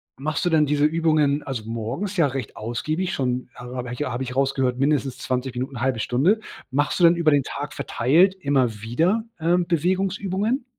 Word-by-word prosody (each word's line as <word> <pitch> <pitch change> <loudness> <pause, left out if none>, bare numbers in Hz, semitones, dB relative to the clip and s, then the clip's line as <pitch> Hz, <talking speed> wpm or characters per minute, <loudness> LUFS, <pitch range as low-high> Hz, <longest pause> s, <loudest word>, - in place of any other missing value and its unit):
machst 150 +4 -2
du 175 - +2
denn 155 -2 +4
diese 145 0 +2
Übungen, 155 -2 +2
also 130 -6 -5
morgens 120 - -4
ja 165 - +4
recht 135 -4 -5
ausgiebig 155 - -2
schon, 125 -1 -2
habe 125 0 -6
ich 125 +4 -3
habe 130 -2 -3
ich 125 -1 -4
rausgehört 135 -2 +1
mindestens 135 -2 +1
20 130 -1 -3
Minuten, 130 -1 -4
1/2 130 -3 0
Stunde. 150 - +2 0.3
Machst 145 +6 0
du - - +2
denn 170 - +6
über 165 -3 +3
den 145 - +4
Tag 145 +2 -5
verteilt 170 +10 +3
immer 130 - +1
wieder, 170 - +1 0.2
ähm, 175 +2 +2
Bewegungsübungen? 190 - 0
145 Hz, 180 wpm, -23 LUFS, 125-170 Hz, 0.3 s, denn